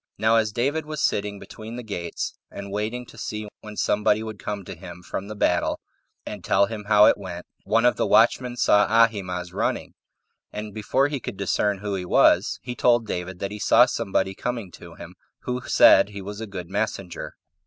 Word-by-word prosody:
Now 110 +1 +3
as 110 -2 +1
David 145 +8 -1
was 155 -1 -5
sitting 100 -5 0
between 110 +3 -9
the 125 - -6
gates, 90 -6 -4 0.2
18 - - -12
and 100 0 -8
waiting 110 +4 -3
to - - -14
see 105 -1 -5
when 105 -1 -10
somebody 105 +1 +2
would 110 -2 -7
come 105 -3 -5
to - - -7
him 90 0 -11
from 95 +2 -5
the 105 - -7
battle, 90 -3 +1 0.5
and - - -7
tell 100 - +3
him 105 -1 -7
how 105 0 +6
it - - +4
went, 90 -3 -7 0.2
one 115 +2 +2
of 125 - +3
the - - +1
watchmen 120 +3 +3
saw 105 -3 +4
Ahimaaz 100 -6 +1
running, - - -2 0.6
and 105 -1 -6
before 130 +6 +1
he 145 -1 -3
could 105 - -7
discern 100 +1 0
who 100 +1 -4
he 95 -2 -3
was, - - +4
he 125 - -5
told 120 -1 +3
David 90 -2 -4
that 100 +2 -4
he 105 - -7
saw 120 - +6
somebody 100 -5 -1
coming 115 -3 -4
to - - -13
him, - - -11 0.3
who 125 0 -3
said - - +6
he 100 -1 -8
was 105 +2 -7
a 110 - -5
good 90 -4 -7
messenger. 95 -2 -4
105 Hz, 205 wpm, -24 LUFS, 100-115 Hz, 0.6 s, how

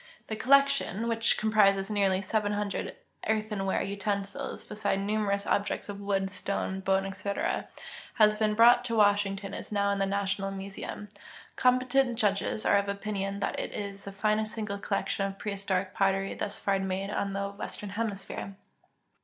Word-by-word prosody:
The 220 - -1
collection, 275 -3 +3
Avhich 230 0 +1
com[)rises 205 -2 +3
nearly 195 -2 +2
7IH) 205 -1 -1 0.4
eartheiiAvare 210 -4 0
utensils, 200 0 -3
beside 205 -2 -1
numerous 200 0 0
objects 205 0 0
of 200 - -5
Avood, 200 -1 0
stone, 190 -1 -2
bone, 190 0 +1
etc., 200 - -2 0.5
has 215 -2 +5
been 210 0 +1
brought 240 +2 +7
to 230 -2 -1
Washington 205 -2 +2
and - - -4
is - - -15
now 200 -1 +2
in 200 - -1
tlie 195 0 +1
National 195 0 -1
Museum. 195 +1 -6 0.5
Competent 255 0 +3
judges 210 -1 0
are - - +5
of 200 0 -2
opinion 200 -1 -3
that - - -1
it - - -4
is 200 -1 -5
the 200 - -6
finest 215 +2 0
single 210 -3 -3
collection 200 - -1
of 195 0 -7
prehistoric 195 -2 -2
pottery 195 -2 +1
thus 205 0 -4
far 195 -1 +1
made 195 +1 -2
on 200 -1 -1
the 200 0 -2
Western 200 0 -6
Hemisphere. 200 -2 -4
200 Hz, 155 wpm, -29 LUFS, 195-215 Hz, 0.5 s, brought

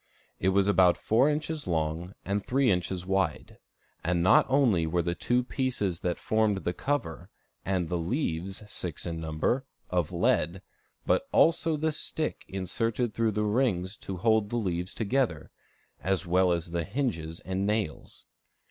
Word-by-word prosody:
It 95 - +2
was 100 +1 +3
about 95 -3 +5
four 120 +6 +3
inches 150 0 -2
long 80 +2 -2
and 100 0 -1
three 130 -2 +2
inches 90 0 -1
wide; 95 -5 -1 0.4
and 85 0 +1
not 95 - +6
only 120 - +3
were 85 +1 +1
the 85 +1 -1
two 120 +8 +1
pieces 120 -9 -2
that 90 -2 -1
formed 110 -3 +1
the 90 - -1
cover, 95 - -3 0.3
and 95 -3 0
the 90 +1 -1
leaves, 95 - -2
six 90 -6 -4
in 85 -1 -3
number, 80 +11 0 0.3
of 90 -3 0
lead, 90 +1 +1 0.4
but - - +2
also 165 -1 +3
the 160 +1 0
stick 155 0 -3
inserted 110 +5 -2
through 115 -2 +1
the 105 +1 0
rings 105 -4 +1
to 95 - -6
hold 110 +1 +2
the 120 - -1
leaves 90 -4 -2
together, 125 +3 -1 0.5
as 95 0 +1
well 90 +1 +3
as 85 0 -2
the 85 -1 -1
hinges 90 - -2
and 95 +2 -2
nails. 105 -8 -3
95 Hz, 155 wpm, -28 LUFS, 85-115 Hz, 0.5 s, not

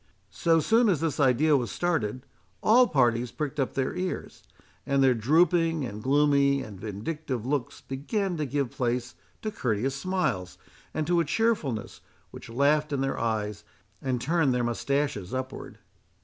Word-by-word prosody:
So 165 -2 +3
soon 225 +7 +3
as 175 -7 +2
this 160 -3 -2
idea 145 +3 +4
was 125 -4 0
started, 130 -8 -1 0.4
all 245 +3 +6
parties 120 - +2
pricked 145 +3 -4
up 135 - -1
their 135 -1 -1
ears; 185 0 -4 0.4
and 140 +2 +2
their 130 -1 +5
drooping, 165 - +2
and 105 -2 -6
gloomy, 140 +1 +3
and 100 -3 -10
vindictive 115 - -4
looks 135 -1 -2
began 175 +8 -2
to 150 -2 -2
give 140 -2 -1
place 125 0 -2 0.3
to 215 - -2
courteous 125 - -1
smiles, 140 - -2 0.3
and 155 - -2
to 175 +1 +2
a - - +3
cheerfulness, 155 - -1 0.3
which - - -11
laughed 145 +5 +2
in 140 -2 -1
their 135 0 -1
eyes, 105 -2 -2 0.4
and 130 -2 -1
turned 145 -1 +1
their 125 - 0
mustaches 120 -3 -1
upwards. 130 +1 -6
140 Hz, 155 wpm, -27 LUFS, 120-160 Hz, 0.4 s, all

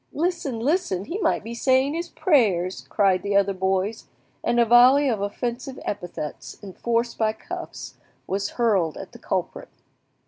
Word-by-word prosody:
"Listen, 320 -7 -1
listen! 240 - 0
he 365 - -4
might 395 - +1
be 230 +2 -6
saying 260 +3 +2
his 340 +1 -4
prayers!" 200 - +1
cried 195 -3 +2
the 200 0 -2
other 200 0 +3
boys; 190 +3 -1 0.4
and 240 0 +1
a 235 - +5
volley 250 +5 +6
of 225 -6 0
offensive 240 +6 -4
epithets, 175 -6 -6
enforced 235 +4 -2
by 220 -1 +2
cuffs, 220 - -8 0.3
was 200 +1 -2
hurled 195 - +2
at - - -9
the - - -13
culprit. - - -3
230 Hz, 150 wpm, -24 LUFS, 195-260 Hz, 0.4 s, volley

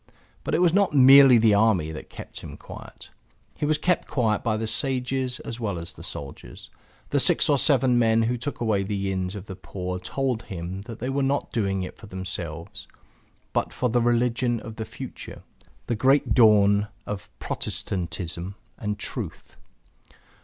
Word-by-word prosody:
But - - -1
it 175 - +3
was 170 -2 +4
not 200 -4 +3
merely 135 -1 +9
the 110 -2 +5
army 100 -7 +3
that 75 - -8
kept - - -9
him - - -9
quiet. - - -11 0.4
He 150 - -2
was 155 0 +2
kept 180 +3 0
quiet 110 -6 +1
by 110 -2 0
the 110 - -2
sages 130 +2 -1
as 115 - -6
well 105 -6 -2
as 85 0 -6
the - - -13
soldiers; 70 -4 -9 0.4
the - - +3
six - - +4
or 145 -2 +3
seven 130 -4 +3
men 115 -1 +3
who 120 +2 +1
took 130 +3 -5
away 110 -4 +1
the 100 -1 -2
inns 95 +1 -2
of 100 -1 -7
the 95 - -7
poor 90 -1 -5
told 125 +5 -2
him 95 0 -6
that 115 - -7
they 125 +3 -4
were 140 +1 0
not 140 +1 0
doing 100 -4 0
it 90 - -8
for 110 - -12
themselves, 90 -4 -6 0.7
but - - 0
for 125 - -1
the 120 +1 +2
religion 120 0 +1
of 110 -2 -9
the 110 - -4
future, - - -9 0.4
the 120 - -1
great 135 +6 +3
dawn 105 -3 +5 0.2
of 105 -2 -6
Protestantism 90 0 -3 0.2
and 105 -2 -2
truth. - - -6
110 Hz, 175 wpm, -25 LUFS, 95-125 Hz, 0.7 s, merely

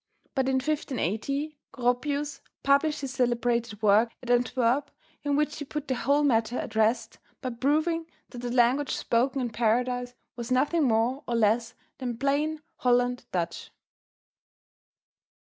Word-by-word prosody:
But 265 -1 +1
in 265 - +2
1580, 275 - -2
Goropius 280 +4 -1 0.2
published 280 +2 +3
his 270 -2 -4
celebrated 240 -3 0
work 215 +3 +5
at 245 - -2
Antwerp, 245 +3 +2 0.3
in 285 -1 +1
which 300 +1 0
he - - -3
put 300 +1 -5
the 260 - +1
whole 280 +3 +2
matter 235 -3 +2
at 220 - -5
rest 220 +1 +1 0.2
by 255 - -3
proving 310 +7 +1 0.2
that 245 - -8
the 245 0 -4
language 255 +3 +3
spoken 255 +3 +1
in 240 -2 -2
Paradise 245 +2 0 0.2
was 235 -1 -6
nothing 290 +5 +3
more 240 +4 +1
or 240 - 0
less 230 +1 +2 0.2
than 245 -3 -3
plain 295 +4 0
Holland 245 0 +1
Dutch. 170 -2 -3
250 Hz, 140 wpm, -27 LUFS, 235-280 Hz, 0.3 s, work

